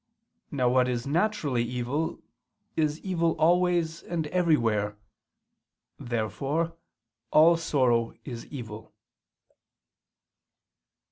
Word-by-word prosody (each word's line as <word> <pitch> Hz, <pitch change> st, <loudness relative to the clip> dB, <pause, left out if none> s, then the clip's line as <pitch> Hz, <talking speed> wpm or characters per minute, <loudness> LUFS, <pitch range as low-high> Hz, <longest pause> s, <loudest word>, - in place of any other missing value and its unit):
Now 130 Hz, -4 st, 0 dB
what 125 Hz, +1 st, +3 dB
is 120 Hz, -1 st, -2 dB
naturally 155 Hz, -, 0 dB
evil, 125 Hz, +6 st, -2 dB, 0.6 s
is 155 Hz, -1 st, 0 dB
evil 170 Hz, -4 st, 0 dB
always 170 Hz, -1 st, +2 dB
and 165 Hz, -2 st, -3 dB
everywhere. 115 Hz, -, +1 dB, 1.0 s
Therefore, 135 Hz, +8 st, -2 dB, 0.6 s
all 165 Hz, +2 st, +6 dB
sorrow 130 Hz, -8 st, +1 dB
is 120 Hz, -4 st, -7 dB
evil. 110 Hz, -6 st, -9 dB
145 Hz, 80 wpm, -27 LUFS, 120-165 Hz, 1.0 s, all